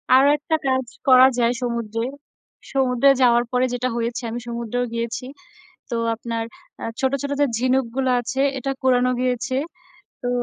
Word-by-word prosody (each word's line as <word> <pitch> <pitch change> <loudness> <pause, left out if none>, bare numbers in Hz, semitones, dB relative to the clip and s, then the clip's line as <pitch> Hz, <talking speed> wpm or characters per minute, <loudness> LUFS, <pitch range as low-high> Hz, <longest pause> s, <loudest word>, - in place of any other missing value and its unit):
আরও 270 +2 +6
একটা 320 +2 -1
কাজ 260 -2 +1 0.2
করা 255 -1 +8
যায় 235 +1 +3
সমুদ্রে। 235 -2 -2 0.7
সমুদ্রে 265 0 +3
যাওয়ার 240 -1 +5
পরে 250 +1 +2
যেটা 250 +1 -1
হয়েছে, 235 +1 -2
আমি 240 - -4
সমুদ্রেও 235 +1 -2
গিয়েছি। 235 +1 -3 0.7
তো - - -2 0.2
আপনার 230 0 -4 0.4
আ - - -3 0.2
ছোট, 265 0 +1
ছোট, 285 - -3
যে, 290 - +5
ঝিনুকগুলো 255 0 +1
আছে 250 +3 -3 0.2
এটা 270 +2 -3
কুরানো 250 -1 +3
হয়েছে। 255 +1 -1 0.7
তো 245 - -2
250 Hz, 150 wpm, -22 LUFS, 235-260 Hz, 0.7 s, করা